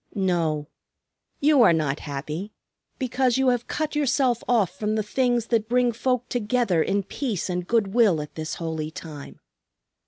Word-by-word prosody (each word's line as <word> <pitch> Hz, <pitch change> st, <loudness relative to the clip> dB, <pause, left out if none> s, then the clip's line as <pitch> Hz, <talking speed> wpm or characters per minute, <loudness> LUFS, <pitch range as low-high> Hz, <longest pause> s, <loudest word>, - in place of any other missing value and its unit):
"No, 165 Hz, -6 st, 0 dB, 0.7 s
you 290 Hz, -2 st, +5 dB
are 205 Hz, -7 st, +7 dB
not 150 Hz, -3 st, 0 dB
happy 150 Hz, +8 st, -5 dB, 0.4 s
because 255 Hz, -1 st, +1 dB
you 265 Hz, -1 st, +3 dB
have 245 Hz, -1 st, 0 dB
cut 305 Hz, 0 st, -2 dB
yourself 260 Hz, -4 st, +1 dB
off 220 Hz, -7 st, +2 dB
from 210 Hz, +3 st, -2 dB
the 215 Hz, -, 0 dB
things 240 Hz, +1 st, +1 dB
that 225 Hz, -2 st, +1 dB
bring 245 Hz, 0 st, +3 dB
folk 250 Hz, +1 st, -1 dB
together 235 Hz, -6 st, +1 dB
in 200 Hz, +4 st, 0 dB
peace 200 Hz, -, -3 dB
and 180 Hz, 0 st, -3 dB
good 220 Hz, -5 st, +1 dB
will 220 Hz, -9 st, +4 dB
at 150 Hz, 0 st, -7 dB
this 155 Hz, 0 st, -4 dB
holy 160 Hz, -2 st, -4 dB
time. 155 Hz, -3 st, -10 dB
215 Hz, 160 wpm, -24 LUFS, 165-245 Hz, 0.7 s, are